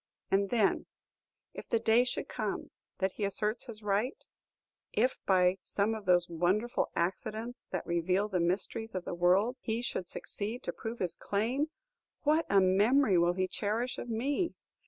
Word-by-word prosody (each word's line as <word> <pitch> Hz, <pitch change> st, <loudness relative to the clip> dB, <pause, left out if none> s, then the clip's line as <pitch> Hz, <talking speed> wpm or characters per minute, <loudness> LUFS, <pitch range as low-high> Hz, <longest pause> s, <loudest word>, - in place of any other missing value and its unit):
And 195 Hz, 0 st, +3 dB
then, 220 Hz, -5 st, +2 dB, 0.7 s
if -, -, -9 dB
the 230 Hz, -, +3 dB
day 225 Hz, +1 st, +4 dB
should 250 Hz, -, -3 dB
come -, -, -3 dB, 0.3 s
that 190 Hz, 0 st, +1 dB
he 210 Hz, -, -5 dB
asserts 210 Hz, +3 st, -1 dB
his 220 Hz, -2 st, -9 dB
right, 210 Hz, +6 st, -1 dB, 0.7 s
if, 250 Hz, +4 st, +1 dB
by 185 Hz, 0 st, +4 dB
some 205 Hz, +2 st, 0 dB
of 215 Hz, -2 st, -6 dB
those 175 Hz, -1 st, +4 dB
wonderful 185 Hz, +8 st, +1 dB
accidents 215 Hz, +7 st, -3 dB
that 185 Hz, -, -3 dB
reveal 180 Hz, +4 st, +1 dB
the 190 Hz, -4 st, -1 dB
mysteries 190 Hz, +5 st, -1 dB
of 185 Hz, -, -3 dB
the -, -, -3 dB
world, 185 Hz, +8 st, +3 dB
he 230 Hz, +2 st, -2 dB
should 185 Hz, -6 st, -3 dB
succeed 220 Hz, +4 st, -4 dB
to -, -, -3 dB
prove 230 Hz, 0 st, -5 dB
his 180 Hz, -5 st, -1 dB
claim, 245 Hz, +9 st, -1 dB, 0.5 s
what 310 Hz, +2 st, +3 dB
a 200 Hz, -, +6 dB
memory 200 Hz, +3 st, +4 dB
will 175 Hz, +1 st, +3 dB
he 185 Hz, +1 st, 0 dB
cherish 225 Hz, +6 st, -1 dB
of -, -, -6 dB
_me! 275 Hz, +9 st, -1 dB
210 Hz, 165 wpm, -31 LUFS, 185-235 Hz, 0.7 s, a